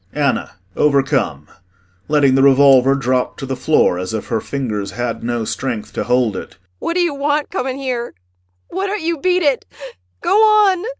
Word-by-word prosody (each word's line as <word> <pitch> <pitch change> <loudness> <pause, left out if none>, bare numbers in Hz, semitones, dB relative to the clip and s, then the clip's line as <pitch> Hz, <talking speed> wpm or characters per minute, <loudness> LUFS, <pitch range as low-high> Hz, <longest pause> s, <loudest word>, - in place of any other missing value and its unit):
ANNA 145 -3 -1 0.2
[Overcome 135 - +1 0.6
letting 145 -3 +3
the 135 - +3
revolver 135 -1 +5
drop 130 -2 -1
to 135 - -6
the 135 0 -3
floor, 130 - +2
as 90 +4 -4
if 110 - -6
her 115 -2 -1
fingers 110 -8 -4
had 120 +1 -4
no 120 -1 -2
strength 115 -3 -4
to - - -3
hold 125 -4 +1
it - - -7
hysterically.] 90 - -40
What - - -2
d'you 350 -4 +1
want 290 +2 -1
coming 265 -7 -3
here? 250 -3 -4 0.5
Why 385 +2 -3
don't 405 -3 -3
you 335 -1 -1
beat 365 +2 +1
it? 280 -4 +1 0.6
Go 345 - -1
on! 420 -4 +4
140 Hz, 175 wpm, -18 LUFS, -, 0.6 s, revolver